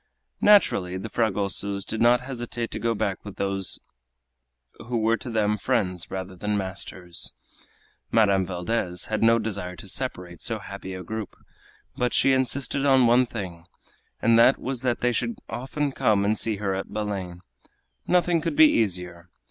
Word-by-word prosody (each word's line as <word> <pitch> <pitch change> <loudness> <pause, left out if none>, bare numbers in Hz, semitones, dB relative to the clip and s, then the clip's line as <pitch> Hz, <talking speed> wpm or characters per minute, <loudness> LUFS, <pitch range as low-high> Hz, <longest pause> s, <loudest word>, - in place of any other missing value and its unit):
Naturally 130 - +4
the 110 +4 -6
Fragosos 100 -2 -1
did 110 - -3
not 120 +1 +5
hesitate 120 -2 -4
to - - -4
go 115 0 0
back 100 -3 -2
with 105 -2 -9
those 95 -1 -1 1.1
who 120 -1 -1
were 115 +1 +3
to 125 - -6
them 105 -2 +1
friends 95 -8 -1
rather 95 0 -5
than 105 +3 -1
masters. 95 -2 -5 0.8
Madame 100 -4 +4
Valdez 90 0 -2
had 110 - 0
no 115 +1 +5
desire 100 -5 -3
to 100 - -11
separate 90 -7 -5
so 115 -2 0
happy 95 -2 -8
a 90 - -7
group, 110 +2 -5 0.6
but 125 0 0
she 135 - +4
insisted 130 +1 0
on 135 -3 +5
one 120 +2 +4
thing, 90 -8 -7 0.6
and 115 0 +5
that 130 +3 +6
was 130 -2 -4
that 125 -2 0
they 125 - +2
should 115 0 -2
often 140 +3 -3
come 105 -5 +2
and 105 +2 +2
see 110 0 0
her 100 -1 -2
at 95 0 -4
Belem. 95 -4 -4 0.7
Nothing 175 -2 +3
could 290 - -2
be 315 +1 +8
easier. 90 -4 -1
110 Hz, 165 wpm, -25 LUFS, 95-120 Hz, 1.1 s, be